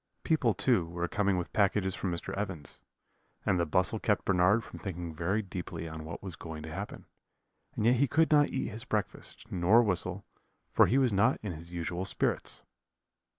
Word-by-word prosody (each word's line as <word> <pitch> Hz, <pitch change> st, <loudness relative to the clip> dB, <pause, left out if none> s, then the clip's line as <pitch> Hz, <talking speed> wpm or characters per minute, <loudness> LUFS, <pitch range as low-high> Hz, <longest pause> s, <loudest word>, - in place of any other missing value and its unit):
People, 130 Hz, -, +2 dB
too, 100 Hz, -9 st, +2 dB
were 85 Hz, +1 st, -3 dB
coming 100 Hz, +1 st, +1 dB
with 90 Hz, -, -4 dB
packages 100 Hz, -2 st, +2 dB
from 95 Hz, -, -3 dB
Mr. 85 Hz, -, -4 dB
Evans's, 95 Hz, -8 st, -5 dB, 0.7 s
and 90 Hz, -, +2 dB
the 85 Hz, -, +1 dB
bustle 95 Hz, +7 st, +1 dB
kept 105 Hz, -2 st, +1 dB
Bernard 95 Hz, +4 st, +4 dB
from -, -, -10 dB
thinking 90 Hz, -4 st, -5 dB
very 90 Hz, +7 st, 0 dB
deeply 90 Hz, -3 st, -6 dB
on 80 Hz, -1 st, -7 dB
what 80 Hz, +4 st, -7 dB
was 95 Hz, -4 st, -5 dB
going 80 Hz, -2 st, -7 dB
to 80 Hz, 0 st, -7 dB
happen; -, -, -6 dB, 0.7 s
and 105 Hz, -, -1 dB
yet 120 Hz, +2 st, +5 dB
he 140 Hz, +3 st, +3 dB
could 160 Hz, +6 st, +3 dB
not 145 Hz, -1 st, +5 dB
eat 135 Hz, -, -2 dB
his 110 Hz, +3 st, -7 dB
breakfast, 110 Hz, -5 st, -4 dB
nor 95 Hz, +7 st, +5 dB
whistle, 95 Hz, -6 st, -2 dB, 0.5 s
for -, -, +6 dB
he 130 Hz, -, +3 dB
was 130 Hz, -5 st, +3 dB
not 115 Hz, +7 st, +3 dB
in 105 Hz, -, -3 dB
his 85 Hz, +1 st, -8 dB
usual 85 Hz, +1 st, -3 dB
spirits. -, -, -1 dB
95 Hz, 190 wpm, -30 LUFS, 85-110 Hz, 0.7 s, for